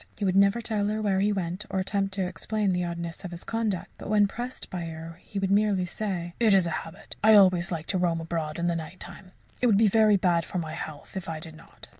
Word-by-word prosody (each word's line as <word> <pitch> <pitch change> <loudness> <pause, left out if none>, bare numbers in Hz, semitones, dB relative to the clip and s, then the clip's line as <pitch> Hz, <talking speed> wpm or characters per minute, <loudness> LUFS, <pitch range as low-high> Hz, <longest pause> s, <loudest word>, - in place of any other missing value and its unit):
He 205 - -2
would 185 -1 +1
never 200 +4 +4
tell 215 -3 -1
her 215 +1 -1
where 200 -3 +1
he 205 +2 +2
went 190 +1 -3
or 190 - -2
attempt 195 +1 -1
to 190 -2 0
explain 195 +3 -1
the 180 0 0
oddness 170 +1 -5
of 180 - -5
his 170 0 -8
conduct, 220 -5 -2
but - - -7
when 210 -1 +5
pressed 245 +5 -6
by 175 -2 -4
her 165 +1 -8 0.2
would 195 0 0
merely 200 -2 +3
say: 175 -2 -4
"It 220 -4 +5
is 190 -2 +4
a 170 - -2
habit. 165 - -7
I 220 0 +8
always 185 -3 +5
like 165 -2 -3
to 185 - -1
roam 170 -2 +1
abroad 165 -2 -3
in 170 - -1
the 170 -1 +1
night 165 +2 -6
time 185 -2 -10 0.3
it 250 - +4
would 210 -4 +5
be 220 +1 +5
very 215 0 +5
bad 175 -3 +2
for 180 - -5
my 160 -3 -3
health 155 +3 -8
if 190 -3 -5
I 160 -1 -4
did 160 0 -9
not." - - -15
185 Hz, 255 wpm, -27 LUFS, 170-205 Hz, 0.3 s, I